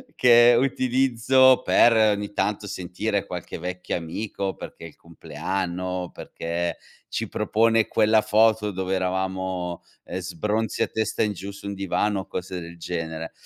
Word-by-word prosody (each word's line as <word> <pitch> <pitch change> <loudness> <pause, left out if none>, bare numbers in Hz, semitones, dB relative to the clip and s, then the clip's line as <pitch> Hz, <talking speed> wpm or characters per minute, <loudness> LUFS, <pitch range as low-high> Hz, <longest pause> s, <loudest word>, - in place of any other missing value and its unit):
che 120 -1 +7
utilizzo 130 0 +3
per 120 - +5
ogni 105 -2 +2
tanto 105 0 -1
sentire 100 +3 -2
qualche 90 -1 -6
vecchio 90 +2 -4
amico, 95 +3 -4
perché - - -10
è - - -6
il - - -20
compleanno, 90 +1 -4
perché 85 +1 -4 0.3
ci - - -3
propone 115 0 +2
quella 110 0 +3
foto 110 0 +3
dove 95 0 -3
eravamo, 95 -1 -2 0.2
eh, 95 - -5
sbronzi 105 +5 -1
a - - -1
testa 110 0 -1
in 105 -1 0
giù 100 +1 -7
su 100 0 -12
un 100 - -3
divano 100 +1 0
o - - -12
cose 90 0 -5
del 85 0 -10
genere. 80 -1 -5
95 Hz, 145 wpm, -24 LUFS, 90-110 Hz, 0.3 s, che